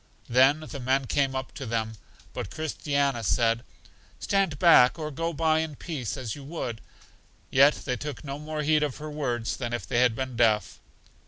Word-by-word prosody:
Then 135 +5 +4
the 155 -2 -7
men 130 +2 +1
came 135 +1 0
up 130 0 -4
to 135 - -7
them, 110 -1 -2 0.4
but 95 - -5
Christiana 140 -4 -1
said: 115 +2 +2 0.6
Stand 195 -7 0
back, 150 -6 +6
or 155 -1 -4
go 165 +4 -2
by 160 0 +2
in 160 -2 -3
peace, 130 - -5
as 120 -5 -4
you 145 - -9
should. 120 -9 -4 0.7
Yet 140 +3 +6
they 125 -2 -1
took 145 +3 -6
no 140 0 -5
more 155 0 -4
heed 155 +1 +3
of 145 -4 -1
her 155 0 -7
words 120 -6 -2
than 120 -2 -4
if 115 -5 -3
they 120 +5 0
had 125 -2 +3
been 130 0 -4
deaf. 110 -2 +2
135 Hz, 185 wpm, -27 LUFS, 120-150 Hz, 0.7 s, back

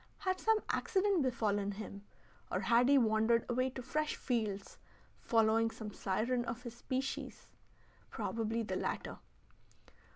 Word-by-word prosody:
Had 370 -1 -1
some 445 0 +3
accident 395 -4 +2
befallen 205 -6 0
him, 200 0 -8 0.5
or - - 0
had 240 +2 +4
he 280 - +7
wandered 225 -1 +3
away 255 +1 +1
to 260 0 -7
fresh 305 +4 -1
fields, 215 -6 -2 0.4
following 225 0 +3
some 215 -2 -7
siren 235 +6 0
of 240 +1 -5
his 240 -2 -7
species? 260 +2 -4 0.6
Probably 225 0 -2
the - - -2
latter. - - -3
235 Hz, 130 wpm, -35 LUFS, 220-260 Hz, 0.6 s, he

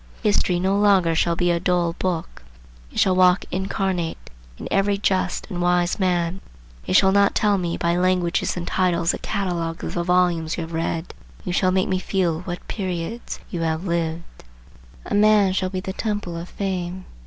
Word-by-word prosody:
History 200 -4 +2
no 190 +2 +1
longer 195 -5 +4
shall 170 +1 +1
be 175 0 +1
a 170 - +1
dull 175 -1 +1
book. 175 -2 -3 0.5
It - - -11
shall 185 -1 +4
walk 185 0 +4
incarnate 185 -2 -2 0.3
in - - -7
every 200 +1 +2
just 190 -2 0
and 175 -2 -3
wise 175 +1 +1
man. 180 -1 0 0.5
You 95 - 0
shall 190 - +6
not 200 0 +3
tell 205 -2 +2
me 170 -2 -2
by 170 0 +1
languages 180 -1 +1
and 175 - -3
titles 175 -2 +1
a - - -5
catalogue 175 -5 -3
of - - -4
the 175 - -1
volumes 175 -3 +1
you - - -2
have 165 0 -7
read. 165 +1 -2 0.3
You 180 - -2
shall 185 +1 +2
make 185 0 +1
me 185 -1 0
feel 180 -4 0
what 175 -1 -7
periods 185 +3 -4
you 175 -4 -3
have 160 +2 -1
lived. 170 -1 -3 0.6
A - - -5
man 205 -2 +4
shall 185 0 0
be 185 -1 -4
the 190 0 -5
Temple 205 -5 -3
of 170 +2 -6
Fame. 185 -2 -4
180 Hz, 185 wpm, -22 LUFS, 170-190 Hz, 0.6 s, shall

